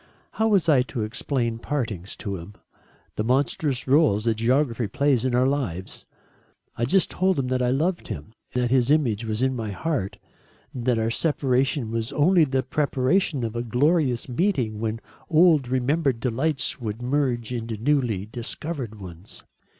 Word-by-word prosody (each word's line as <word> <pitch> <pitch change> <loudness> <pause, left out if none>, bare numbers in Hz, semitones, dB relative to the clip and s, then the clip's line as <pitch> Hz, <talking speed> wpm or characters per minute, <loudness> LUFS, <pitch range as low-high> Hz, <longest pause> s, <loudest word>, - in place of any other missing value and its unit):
How 220 - 0
was 200 -6 +3
I 145 -5 +5
to 125 -3 -3
explain 115 +1 -2
partings 115 -9 -3
to 100 -1 -5
him? 90 +4 -11 0.6
The 105 - 0
monstrous 130 +2 0
rôle 135 -7 +3
that 115 -1 +2
geography 120 +1 +1
plays 130 +2 +1
in 125 -2 +1
our 125 +1 +3
lives? 125 -10 -3 0.7
I 120 - 0
just 190 +9 +2
told 185 0 +1
him 130 -2 -1
that 130 0 0
I 125 - +2
loved 165 +8 0
him, 75 +8 -7 0.2
that 125 -1 +1
his 130 -1 +3
image 120 -8 +2
was 110 +2 -2
in 130 0 +1
my 110 -3 -4
heart, 115 -1 -3 0.6
that 125 -1 0
our 110 0 0
separation 135 -3 +1
was 115 +2 -2
only 165 +2 +4
the 135 -1 0
preparation 140 +2 +1
of 115 0 -3
a 120 - -1
glorious 125 +2 +1
meeting 125 - 0
when 110 +1 -3 0.3
old 160 -5 +5
remembered 130 +1 +1
delights 135 +4 -1
would 110 +1 -4
merge 125 -3 0
into 115 -2 -4
newly 120 -5 0
discovered 120 +1 -5
ones. 90 0 -10
125 Hz, 160 wpm, -24 LUFS, 115-145 Hz, 0.7 s, I